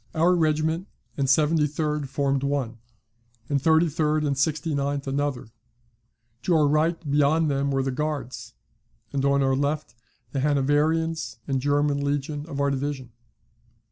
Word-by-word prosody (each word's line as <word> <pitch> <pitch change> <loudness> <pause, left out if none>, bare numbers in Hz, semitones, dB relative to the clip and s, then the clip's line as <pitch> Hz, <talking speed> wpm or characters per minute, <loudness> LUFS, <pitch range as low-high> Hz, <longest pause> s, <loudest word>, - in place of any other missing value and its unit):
Our 170 +3 +4
regiment 160 +2 +1 0.3
and 140 -1 0
73d 150 0 +1
formed 135 0 0
one, 135 -5 -2 0.7
and 140 -2 +1
33d 155 -1 +2
and 140 -1 0
69th 145 -1 -1
another; 140 -3 -2 0.9
to 170 +7 +1
our 150 -2 +4
right 155 +3 +2
beyond 150 +2 +3
them 140 0 0
were 135 -1 0
the 135 - -1
Guards, 140 - -4 0.6
and 135 -1 0
on 140 0 +3
our 135 0 +2
left 145 -1 -2 0.4
the 135 - -2
Hanoverians 145 -2 +1
and 135 -1 0
German 145 0 +1
legion 145 +1 -2
of 140 -3 -5
our 140 0 +2
division. 135 -2 -3
145 Hz, 135 wpm, -25 LUFS, 140-155 Hz, 0.9 s, Our